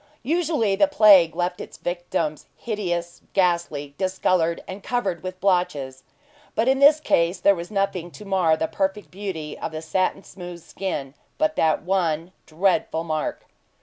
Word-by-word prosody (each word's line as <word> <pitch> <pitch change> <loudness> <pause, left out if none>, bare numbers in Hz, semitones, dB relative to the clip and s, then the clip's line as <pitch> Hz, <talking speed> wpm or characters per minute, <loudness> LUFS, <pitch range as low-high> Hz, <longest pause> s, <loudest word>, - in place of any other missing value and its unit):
Usually 300 - +1
the 290 - +4
plague 205 - +6
left 180 0 -2
its - - -9
victims 175 -3 -3
hideous, 175 -6 -3
ghastly, 170 -6 0
discolored, 185 -3 +1
and 190 +2 -7
covered 195 -10 -2
with 185 0 -6
blotches; 150 -9 0 0.5
but 225 - +1
in 265 0 +3
this 290 +2 +7
case 170 - +2
then 200 - +5
was 170 0 -7
nothing 195 -4 -1
to 210 +4 -12
mar 180 -5 +2
the 160 - -1
perfect 195 +3 -2
beauty 180 -6 -5
of - - -4
the 155 0 -5
satin 185 +4 0
smooth 175 -2 -10
skin, 145 -8 -4 0.2
but 310 0 +1
that 160 -1 +2
one 170 -2 0 0.2
dreadful 165 -1 +1
mark. 155 -2 -3
180 Hz, 150 wpm, -23 LUFS, 165-200 Hz, 0.5 s, this